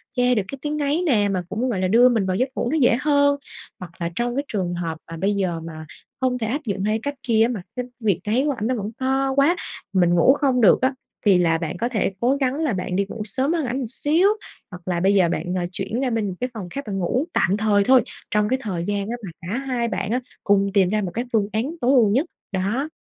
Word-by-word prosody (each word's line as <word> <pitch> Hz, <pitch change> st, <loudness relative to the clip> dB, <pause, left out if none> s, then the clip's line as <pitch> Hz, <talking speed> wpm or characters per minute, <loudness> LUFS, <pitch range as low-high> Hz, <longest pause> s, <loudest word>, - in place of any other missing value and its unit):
che 250 Hz, 0 st, +3 dB
được 215 Hz, -, +2 dB
cái 275 Hz, -, -7 dB
tiếng 300 Hz, 0 st, -2 dB
ngáy 295 Hz, +3 st, 0 dB
nè, 210 Hz, -10 st, +3 dB
mà 185 Hz, -2 st, -1 dB
cũng, 235 Hz, +6 st, -1 dB
gọi 210 Hz, -6 st, -1 dB
là, 185 Hz, -, +2 dB
đưa 235 Hz, +6 st, +6 dB
mình 225 Hz, -5 st, +1 dB
vào 185 Hz, -1 st, 0 dB
giấc 255 Hz, +7 st, +1 dB
ngủ 240 Hz, -, -1 dB
nó 320 Hz, -, +1 dB
dễ 245 Hz, -5 st, +4 dB
hơn. 285 Hz, -1 st, +3 dB, 0.4 s
Hoặc 180 Hz, -3 st, -8 dB
là 170 Hz, -1 st, -1 dB
trong 240 Hz, +3 st, -1 dB
cái 280 Hz, -, 0 dB
trường 185 Hz, -4 st, -2 dB
hợp 165 Hz, -2 st, -3 dB
mà 165 Hz, -, -6 dB
bây 195 Hz, +5 st, +1 dB
giờ 185 Hz, -4 st, -1 dB
mà 160 Hz, -1 st, -8 dB, 0.4 s
không 255 Hz, -1 st, +1 dB
thể 225 Hz, -3 st, -2 dB
áp 275 Hz, +7 st, -2 dB
dụng 200 Hz, -3 st, -2 dB
hai 215 Hz, +2 st, +1 dB
cách 285 Hz, 0 st, -3 dB
kia 225 Hz, -3 st, +3 dB
á, 230 Hz, -, +2 dB
mà 230 Hz, -6 st, -3 dB
cái 250 Hz, -1 st, -3 dB
việc 205 Hz, -7 st, +1 dB
ngáy 225 Hz, +6 st, +2 dB
của 295 Hz, -, +2 dB
ảnh 230 Hz, -5 st, -2 dB
nó 255 Hz, -, 0 dB
vẫn 210 Hz, -1 st, -4 dB
to 270 Hz, +1 st, +1 dB
quá 285 Hz, +6 st, +4 dB, 0.4 s
mình 175 Hz, -2 st, +3 dB
ngủ 175 Hz, +10 st, +6 dB
không 270 Hz, -3 st, +1 dB
được 210 Hz, -, +6 dB
á, 260 Hz, +1 st, +2 dB, 0.3 s
thì 195 Hz, -3 st, +6 dB
là 165 Hz, -2 st, +3 dB
bạn 165 Hz, 0 st, -4 dB
có 235 Hz, +6 st, -1 dB
thể 215 Hz, -5 st, 0 dB
cố 250 Hz, +3 st, +2 dB
gắng 270 Hz, -2 st, 0 dB
là 305 Hz, -5 st, 0 dB
bạn 180 Hz, -1 st, -3 dB
đi 200 Hz, +1 st, +1 dB
ngủ 225 Hz, -, -6 dB
sớm 260 Hz, -, 0 dB
hơn 325 Hz, -4 st, 0 dB
ảnh 245 Hz, +1 st, -2 dB
một 265 Hz, -3 st, -3 dB
xíu, 305 Hz, -, +2 dB, 0.4 s
hoặc 180 Hz, -1 st, -9 dB
là 180 Hz, -2 st, -1 dB
bây 190 Hz, +3 st, +3 dB
giờ 180 Hz, -4 st, +4 dB
bạn, 175 Hz, +1 st, -2 dB
ờ, 180 Hz, -, -1 dB
chuyển 195 Hz, +5 st, -3 dB
ra 265 Hz, -1 st, 0 dB
bên 225 Hz, -3 st, -1 dB
một 190 Hz, -, -3 dB
cái 250 Hz, -, -2 dB
phòng 200 Hz, -6 st, -6 dB
khác 280 Hz, +9 st, -5 dB
bạn 195 Hz, -2 st, -3 dB
ngủ, 245 Hz, -, 0 dB
tạm 190 Hz, +3 st, +2 dB
thời 210 Hz, -2 st, +3 dB
thôi, 255 Hz, +4 st, +6 dB, 0.3 s
trong 210 Hz, 0 st, +2 dB
cái 260 Hz, +1 st, +1 dB
thời 180 Hz, -7 st, -3 dB
gian 205 Hz, 0 st, -2 dB
á 235 Hz, -, -2 dB
mà -, -, -6 dB
cả 185 Hz, +7 st, -3 dB
hai 240 Hz, -3 st, 0 dB
bạn 195 Hz, -1 st, -3 dB
á 245 Hz, -, +1 dB, 0.2 s
cùng 200 Hz, -1 st, +3 dB
tìm 190 Hz, -3 st, +4 dB
ra 215 Hz, +2 st, +1 dB
một 185 Hz, -3 st, -3 dB
cái 240 Hz, +5 st, -2 dB
phương 210 Hz, -3 st, +2 dB
án 250 Hz, +10 st, -1 dB
tối 245 Hz, -, +3 dB
ưu 235 Hz, -6 st, +5 dB
nhất, 260 Hz, +10 st, +2 dB, 0.3 s
đó. 205 Hz, +10 st, -1 dB
220 Hz, 275 wpm, -22 LUFS, 190-260 Hz, 0.4 s, đưa